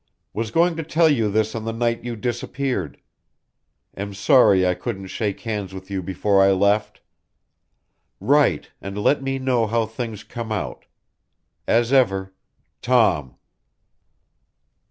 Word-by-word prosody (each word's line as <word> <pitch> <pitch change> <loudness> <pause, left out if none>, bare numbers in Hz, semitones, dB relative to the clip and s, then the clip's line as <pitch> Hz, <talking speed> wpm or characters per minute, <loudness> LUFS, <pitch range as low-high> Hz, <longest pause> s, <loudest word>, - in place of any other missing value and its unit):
Was 115 0 -3
going 170 +6 +2
to 160 - -3
tell 160 +1 +3
you 115 -8 +2
this 110 +1 0
on 115 - -4
the 115 - -3
night 115 0 -1
you 120 -1 -4
disappeared. 120 - -3 1.0
Am 100 0 -6
sorry 100 -3 +5
I 90 - +2
couldn't 95 +1 -6
shake 105 -3 -3
hands 105 -4 -4
with 95 +1 -10
you 95 -1 -2
before 95 +2 +1
I 95 0 +5
left. 100 +3 +1 1.2
Write 140 - +2
and 95 +1 -6
let 135 +7 +2
me 135 0 -2
know 125 -4 +1
how 115 +1 +1
things 110 -1 -6
come 115 -2 -7
out. 80 - -4 0.8
As 120 +2 +2
ever, 95 -7 +2 0.5
TOM. 95 - +2
110 Hz, 135 wpm, -22 LUFS, 95-120 Hz, 1.2 s, sorry